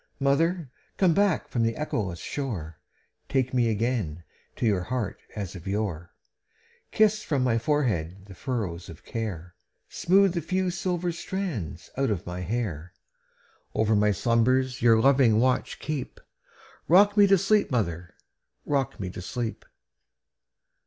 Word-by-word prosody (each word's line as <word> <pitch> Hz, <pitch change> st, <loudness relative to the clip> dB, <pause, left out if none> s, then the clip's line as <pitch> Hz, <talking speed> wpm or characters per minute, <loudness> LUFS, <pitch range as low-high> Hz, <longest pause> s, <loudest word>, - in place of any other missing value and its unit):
Mother, 145 Hz, +2 st, +1 dB, 0.3 s
come 185 Hz, -4 st, +4 dB
back 200 Hz, -1 st, +2 dB
from 120 Hz, -, -2 dB
the 115 Hz, 0 st, +1 dB
echoless 105 Hz, -, -2 dB
shore, 85 Hz, -, -5 dB, 0.5 s
Take 130 Hz, -2 st, 0 dB
me 120 Hz, -2 st, +3 dB
again 105 Hz, -8 st, -1 dB, 0.3 s
to -, -, -2 dB
your 100 Hz, -5 st, +2 dB
heart 115 Hz, +4 st, -3 dB
as 100 Hz, -4 st, -4 dB
of 90 Hz, 0 st, -9 dB
yore; 95 Hz, -4 st, -2 dB, 0.8 s
Kiss 215 Hz, -1 st, +3 dB
from 140 Hz, -9 st, 0 dB
my 115 Hz, -2 st, +2 dB
forehead 105 Hz, -, -1 dB
the 100 Hz, -, -11 dB
furrows 95 Hz, -7 st, -4 dB
of 80 Hz, -, -12 dB
care, 90 Hz, -7 st, -5 dB, 0.4 s
Smooth 190 Hz, +1 st, +3 dB
the 170 Hz, -, -1 dB
few 185 Hz, +3 st, 0 dB
silver 175 Hz, -1 st, -1 dB
threads 165 Hz, -, -5 dB
out 135 Hz, -1 st, +1 dB
of 100 Hz, -5 st, -2 dB
my 90 Hz, +1 st, -5 dB
hair; 90 Hz, -4 st, -3 dB, 0.8 s
Over 110 Hz, 0 st, +2 dB
my 105 Hz, 0 st, +3 dB
slumbers 125 Hz, +5 st, +1 dB
your 115 Hz, -1 st, +5 dB
loving 125 Hz, -3 st, +4 dB
watch 130 Hz, +1 st, +1 dB
keep;—Rock 175 Hz, +6 st, -1 dB
me 205 Hz, -1 st, +7 dB
to 195 Hz, 0 st, +5 dB
sleep, 210 Hz, +3 st, +2 dB
mother,—rock 115 Hz, -, -4 dB
me 95 Hz, -2 st, -4 dB
to 90 Hz, -, -7 dB
sleep! 110 Hz, +5 st, -4 dB
120 Hz, 135 wpm, -26 LUFS, 95-150 Hz, 0.8 s, me